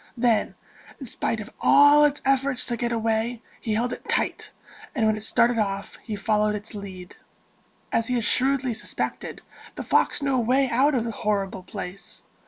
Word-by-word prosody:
Then, 235 Hz, -2 st, +1 dB, 0.4 s
in 270 Hz, -, -7 dB
spite 225 Hz, -1 st, -2 dB
of 210 Hz, -, -10 dB
all 290 Hz, +1 st, +6 dB
its 295 Hz, 0 st, -1 dB
efforts 270 Hz, -1 st, +1 dB
to 240 Hz, -, -2 dB
get 240 Hz, +1 st, -2 dB
away, 225 Hz, +1 st, -1 dB, 0.2 s
he 220 Hz, -3 st, -2 dB
held 245 Hz, +3 st, 0 dB
it -, -, -10 dB
tight; -, -, -1 dB, 0.5 s
and 230 Hz, -5 st, +1 dB
when 215 Hz, 0 st, +3 dB
it 215 Hz, -, -7 dB
started 235 Hz, +1 st, +3 dB
off, 200 Hz, -1 st, -2 dB
he 220 Hz, -, -6 dB
followed 210 Hz, +1 st, +1 dB
its 210 Hz, +2 st, -7 dB
lead. 190 Hz, -3 st, -9 dB, 0.8 s
As 230 Hz, -, 0 dB
he 250 Hz, -, 0 dB
had 235 Hz, -, 0 dB
shrewdly 260 Hz, 0 st, +2 dB
suspected, -, -, -4 dB, 0.3 s
the -, -, -5 dB
fox -, -, +1 dB
knew 275 Hz, -1 st, +1 dB
a -, -, +2 dB
way 255 Hz, +4 st, +2 dB
out 275 Hz, +4 st, +3 dB
of 240 Hz, -, +1 dB
the 230 Hz, -, -3 dB
horrible 205 Hz, -4 st, -2 dB
place. 180 Hz, +1 st, -8 dB
230 Hz, 185 wpm, -25 LUFS, 210-255 Hz, 0.8 s, all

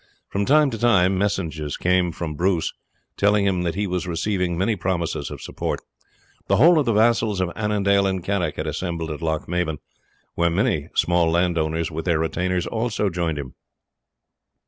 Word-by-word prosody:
From 100 Hz, +1 st, -1 dB
time 150 Hz, 0 st, +4 dB
to 115 Hz, -, -5 dB
time 95 Hz, -6 st, +4 dB
messages 80 Hz, -7 st, -2 dB
came 90 Hz, -1 st, +2 dB
from 80 Hz, -2 st, -5 dB
Bruce, 90 Hz, +2 st, 0 dB, 0.4 s
telling 105 Hz, 0 st, +3 dB
him 95 Hz, -2 st, +1 dB
that 85 Hz, -2 st, -2 dB
he 105 Hz, +2 st, -1 dB
was 90 Hz, -1 st, -2 dB
receiving 90 Hz, 0 st, -1 dB
many 100 Hz, +5 st, +1 dB
promises 90 Hz, -3 st, -2 dB
of -, -, -8 dB
support; -, -, -3 dB, 0.7 s
the -, -, +3 dB
whole 170 Hz, 0 st, +6 dB
of 140 Hz, -, 0 dB
the 115 Hz, -, +3 dB
vassals 110 Hz, -2 st, +2 dB
of 90 Hz, -2 st, 0 dB
Annandale 100 Hz, -2 st, +2 dB
and 95 Hz, -2 st, -2 dB
Carrick 90 Hz, -5 st, -1 dB
had -, -, -4 dB
assembled 85 Hz, -3 st, -3 dB
at 75 Hz, -, -6 dB
Lochmaben, 80 Hz, 0 st, -1 dB, 0.6 s
where 85 Hz, 0 st, +2 dB
many 85 Hz, -, 0 dB
small 85 Hz, -1 st, +3 dB
landowners 85 Hz, -1 st, 0 dB
with 80 Hz, +1 st, -5 dB
their 85 Hz, -3 st, +2 dB
retainers 90 Hz, +3 st, -1 dB
also 110 Hz, -3 st, -1 dB
joined 85 Hz, -3 st, -1 dB
him. 70 Hz, -3 st, -6 dB
90 Hz, 170 wpm, -23 LUFS, 85-100 Hz, 0.7 s, whole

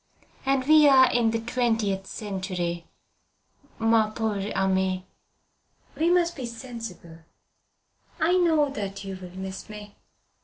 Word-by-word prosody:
"And 270 Hz, -1 st, +2 dB
we 305 Hz, -1 st, +7 dB
are 260 Hz, -2 st, +6 dB
in 235 Hz, -2 st, +2 dB
the 225 Hz, 0 st, -1 dB
twentieth 225 Hz, -5 st, -1 dB
century, 185 Hz, -4 st, -4 dB, 0.9 s
mon 225 Hz, -1 st, +2 dB
pauvre 210 Hz, -3 st, -2 dB
ami. 190 Hz, -1 st, 0 dB, 0.9 s
We 325 Hz, +2 st, +1 dB
must 345 Hz, -1 st, +2 dB
be 255 Hz, -4 st, -5 dB
sensible. 230 Hz, -8 st, -9 dB, 1.0 s
I 335 Hz, +3 st, +2 dB
know 320 Hz, -5 st, +3 dB
that 200 Hz, -7 st, -5 dB
you 195 Hz, -1 st, -6 dB
will 185 Hz, 0 st, -11 dB
miss 190 Hz, +1 st, -7 dB
me. 210 Hz, -1 st, -10 dB
220 Hz, 120 wpm, -26 LUFS, 190-260 Hz, 1.0 s, we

